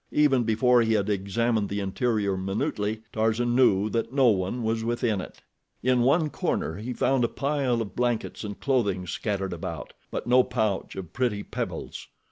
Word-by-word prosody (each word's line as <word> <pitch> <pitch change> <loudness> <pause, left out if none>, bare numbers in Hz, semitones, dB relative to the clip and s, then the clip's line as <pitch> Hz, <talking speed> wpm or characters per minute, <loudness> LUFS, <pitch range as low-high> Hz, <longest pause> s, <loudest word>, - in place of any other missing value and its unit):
Even 140 -4 +3
before 120 +2 +4
he 115 -1 +2
had 105 -1 +1
examined 105 +2 0
the 100 - -2
interior 100 0 0
minutely, 105 +3 -2
Tarzan 115 +2 +1
knew 105 -6 +4
that 115 0 -1
no 135 -2 +4
one 100 +4 0
was 110 0 0
within 115 -3 0
it. - - -11 0.4
In 125 0 +3
one 150 +5 +3
corner 80 - -2
he 115 +5 -5
found 130 +1 +1
a - - +3
pile 135 -4 0
of 100 - -11
blankets 120 -2 -1
and 105 -1 -6
clothing 100 -9 0
scattered 95 +1 -2
about; 85 - -6 0.2
but - - -4
no 125 +1 +5
pouch 110 -6 -1
of 90 -4 -7
pretty 120 -5 0
pebbles. - - -5
115 Hz, 170 wpm, -26 LUFS, 100-125 Hz, 0.4 s, no